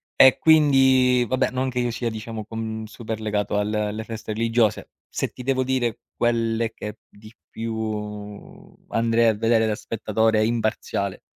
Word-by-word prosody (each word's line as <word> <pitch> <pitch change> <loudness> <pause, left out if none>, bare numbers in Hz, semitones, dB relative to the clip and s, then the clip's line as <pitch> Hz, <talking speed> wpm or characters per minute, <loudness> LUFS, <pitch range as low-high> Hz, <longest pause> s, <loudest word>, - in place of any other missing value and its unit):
e 130 0 +7
quindi, 130 -5 +5
vabbè, 130 - +1
non 130 +1 -1
che 125 -1 -3
io 120 -1 0
sia, 115 +1 -2
diciamo, 110 0 -6
con 110 0 -5
super 110 0 -6
legato 105 -1 -1
al 105 +1 0
alle 105 +1 -2
feste 110 -1 -6
religiose. 115 -1 +1 0.2
Se - - -3
ti 125 - -10
devo 130 0 +1
dire 125 -3 -1 0.2
quelle 115 -1 0
che 105 0 -7
p - - -53
di 110 +2 -16 0.2
più 105 -2 -6
andrei 115 0 +2
a 110 - +4
vedere 115 +1 +2
da 110 - 0
spettatore 110 0 0
imparziale 110 -4 -1
115 Hz, 160 wpm, -23 LUFS, 110-120 Hz, 0.2 s, e